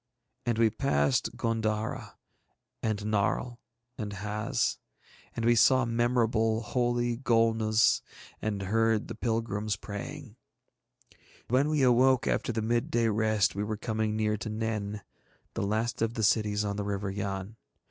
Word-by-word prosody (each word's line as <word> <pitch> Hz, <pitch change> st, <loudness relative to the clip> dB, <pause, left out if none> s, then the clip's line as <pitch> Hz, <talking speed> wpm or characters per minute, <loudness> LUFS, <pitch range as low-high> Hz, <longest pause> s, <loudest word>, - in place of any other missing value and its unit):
And 120 Hz, -2 st, +1 dB
we 115 Hz, -1 st, +4 dB
passed 70 Hz, -, +1 dB
G├│ndara 110 Hz, -1 st, -2 dB, 0.7 s
and 110 Hz, -2 st, 0 dB
Narl 105 Hz, +3 st, 0 dB, 0.4 s
and 105 Hz, -2 st, -4 dB
Haz. 105 Hz, +2 st, -1 dB, 0.6 s
And 115 Hz, -, -2 dB
we 120 Hz, -, +5 dB
saw 130 Hz, +2 st, +5 dB
memorable, 115 Hz, -1 st, +1 dB
holy 120 Hz, 0 st, 0 dB
Golnuz, 115 Hz, -2 st, +3 dB, 0.4 s
and 105 Hz, -2 st, -2 dB
heard 110 Hz, +2 st, +1 dB
the -, -, -4 dB
pilgrims 110 Hz, -3 st, -1 dB
praying. 115 Hz, -, -8 dB, 1.1 s
When 130 Hz, +5 st, +3 dB
we 150 Hz, -3 st, +2 dB
awoke 130 Hz, +1 st, +4 dB
after -, -, 0 dB
the 110 Hz, -1 st, -2 dB
midday 115 Hz, 0 st, +1 dB
rest 110 Hz, -2 st, +2 dB
we 100 Hz, -, -2 dB
were 110 Hz, 0 st, -3 dB
coming 110 Hz, 0 st, -1 dB
near 105 Hz, 0 st, 0 dB
to 110 Hz, -, -5 dB
Nen, 105 Hz, -2 st, -3 dB, 0.5 s
the -, -, -3 dB
last 110 Hz, +3 st, -1 dB
of 115 Hz, +1 st, 0 dB
the 110 Hz, -, -2 dB
cities 105 Hz, 0 st, +2 dB
on 100 Hz, 0 st, -2 dB
the 105 Hz, -, -2 dB
River 100 Hz, -1 st, -2 dB
Yann. 100 Hz, +1 st, -4 dB
110 Hz, 135 wpm, -29 LUFS, 105-120 Hz, 1.1 s, we